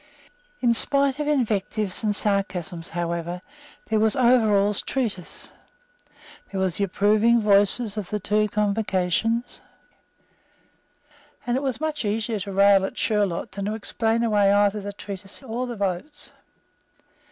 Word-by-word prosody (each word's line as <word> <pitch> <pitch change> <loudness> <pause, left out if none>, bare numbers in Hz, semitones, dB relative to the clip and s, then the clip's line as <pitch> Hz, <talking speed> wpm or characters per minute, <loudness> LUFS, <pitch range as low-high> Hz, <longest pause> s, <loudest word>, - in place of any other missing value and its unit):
In 240 -2 +4
spite 275 +3 +1
of 295 - -2
invectives 215 -7 0
and 210 -1 +1
sarcasms, 185 -5 -1
however, 170 +1 -3 0.4
there 220 -2 +1
was 220 +2 +3
Overall's 215 -6 +3
treatise; 220 -10 -4 1.0
there 195 - -4
were 190 -1 +1
the 200 - -2
approving 215 +5 +3
votes 205 0 +4 0.2
of 210 -4 -5
the 210 - -2
two 210 +2 +1
Convocations; 210 +2 0 1.8
and 240 - 0
it 265 - 0
was 265 -4 -2
much 310 -2 -2
easier 215 +1 -1
to 200 +1 -5
rail 195 0 +5
at 195 - -4
Sherlock 205 -6 0
than 200 0 -4
to 210 +1 -2
explain 225 +1 -1
away 205 -3 +3
either 205 +1 +3
the 205 +1 -5
treatise 200 +3 -8
or 250 +1 -3
the 240 - -5
votes. 200 +9 -3
210 Hz, 135 wpm, -24 LUFS, 195-230 Hz, 1.8 s, rail